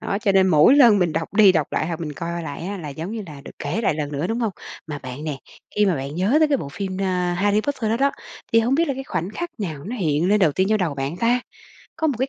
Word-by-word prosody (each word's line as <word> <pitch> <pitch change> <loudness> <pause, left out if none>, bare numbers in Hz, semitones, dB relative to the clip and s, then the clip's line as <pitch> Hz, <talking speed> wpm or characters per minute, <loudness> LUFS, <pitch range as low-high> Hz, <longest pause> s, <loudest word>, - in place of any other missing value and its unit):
Đó, 200 - -2
cho 205 -1 +1
nên 190 -1 +5
mỗi 155 - +6
lần 235 -7 +7
mình 175 -4 +1
đọc 165 +4 -3
đi, 205 -3 +7
đọc 155 -5 +1
lại 155 - 0
hoặc 165 -1 -4
mình 155 -3 -4
coi 170 +2 -4
lại 155 +2 -6
á, 200 0 -4
là 155 - -6
giống 160 +6 -6
như 225 -1 -4
là 150 -4 -10
được - - -9
kể 150 +10 -2
lại 215 - +1
lần 150 -1 -4
nữa, 145 +4 -1
đúng 225 +5 -2
hông? 225 -3 0 0.4
Mà 150 -2 -5
bạn 130 +2 -8
nè, 150 -3 -3 0.4
khi 210 0 +4
mà 190 - +2
bạn 140 0 -5
nhớ 190 - +2
tới 310 - +4
cái 285 - +3
bộ 140 - -6
phim, 190 +5 -5
ờ, 180 -2 0
Harry 205 +4 +2
Potter 245 -3 -2
đó 225 - +2
đó, 275 +3 +2 0.4
thì 230 - +6
hông 240 +4 +1
biết 330 +2 +2
là 275 - 0
cái 270 +1 -6
khoảnh 185 -6 -3
khắc 345 +10 -5
nào 160 -9 -5
nó 230 +7 -5
hiện 165 -3 +1
lên 210 - +4
đầu 160 -6 +4
tiên 190 +5 +1
trong 215 0 +2
đầu 170 -6 -1
bạn 140 +4 -3
ta? 235 +5 +2 0.6
Có 320 - 0
một 280 - 0
cái 260 +2 0
185 Hz, 305 wpm, -22 LUFS, 155-225 Hz, 0.6 s, lần